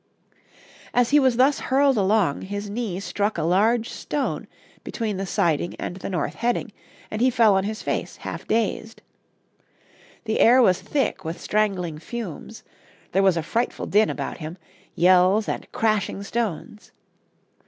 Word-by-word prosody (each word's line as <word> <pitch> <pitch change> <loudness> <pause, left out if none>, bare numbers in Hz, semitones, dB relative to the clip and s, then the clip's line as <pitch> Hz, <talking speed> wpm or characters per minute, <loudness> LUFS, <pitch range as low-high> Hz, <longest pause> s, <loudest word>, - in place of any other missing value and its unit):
As 245 0 +3
he 295 - +6
was 260 -4 +2
thus 270 +3 +4
hurled 275 0 +2
along 200 -6 +2
his 205 +1 -5
knee 210 -5 -3
struck 200 +2 -2
a 160 - -1
large 220 +7 +2
stone 285 -2 -3 0.4
between 215 -4 -3
the 195 0 -3
siding 170 -1 0
and 180 - -5
the 190 - -6
north 175 -6 -2
heading, 240 -1 -1 0.4
and 215 - -3
he 255 - +5
fell 225 -4 +4
on 190 0 +1
his 215 +1 -4
face, - - -3
half - - -7
dazed. 225 0 -1 1.2
The 220 -1 -1
air 245 +3 +6
was 185 -7 +4
thick 270 +8 -1
with 165 +2 -5
strangling 190 -7 -1
fumes, 220 +2 -7 0.5
there 195 - +2
was 190 -3 +3
a 165 - -1
frightful 235 +9 -2
din 210 +2 +3
about - - -4
him 160 +2 -7 0.4
yells 185 +4 +4
and - - -4
crashing 210 -3 0
stones. 210 -1 -4
210 Hz, 155 wpm, -23 LUFS, 185-230 Hz, 1.2 s, he